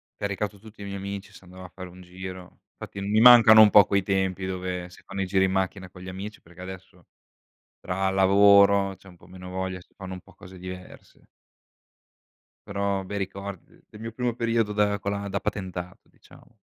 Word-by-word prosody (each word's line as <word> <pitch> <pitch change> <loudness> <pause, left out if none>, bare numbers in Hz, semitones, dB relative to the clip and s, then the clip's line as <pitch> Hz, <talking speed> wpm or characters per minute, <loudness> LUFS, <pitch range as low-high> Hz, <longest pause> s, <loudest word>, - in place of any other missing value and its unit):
caricato 100 0 -4
tutti 110 -1 -15
i - - -6
miei 100 0 -5
amici, 100 +1 -7
si 95 - -15
andava 90 0 -12
a - - -11
fare 95 -1 -10
un 90 +1 -14
giro. 90 0 -10 0.2
Infatti 100 - -8
mi 105 +2 +1
mancano 115 -3 +9
un 105 - +8
po' 105 -1 +8
quei 100 -1 +1
tempi 95 -1 -1
dove 90 -1 -4
si 90 - -17
fanno 95 - -6
i - - 0
giri 95 0 +2
in 95 - -1
macchina 95 0 -2
con 90 - -14
gli 95 - -8
amici, 100 +3 -8
perché 85 +2 -16
adesso, 95 -1 -11 0.7
tra 95 +1 -1
lavoro 100 0 +5
c'è 95 - -20
un 90 - -17
po' - - -19
meno 90 0 -11
voglia, 95 0 -4
si - - -24
fanno 95 -1 -8
un 90 - -8
po' - - -20
cose 95 +1 -14
diverse. 90 0 -11 1.4
Però 100 -1 -1
bei 100 +2 -5
ricordi 100 -1 -6
de - - -24
del 105 - -13
mio 115 0 -6
primo 120 0 -2
periodo 115 -3 0
da 105 -1 +1
con 100 - -3
la 100 0 -4
da 100 0 -2
patentato, 95 -3 -6
diciamo. - - -21
95 Hz, 205 wpm, -25 LUFS, 95-100 Hz, 1.4 s, mancano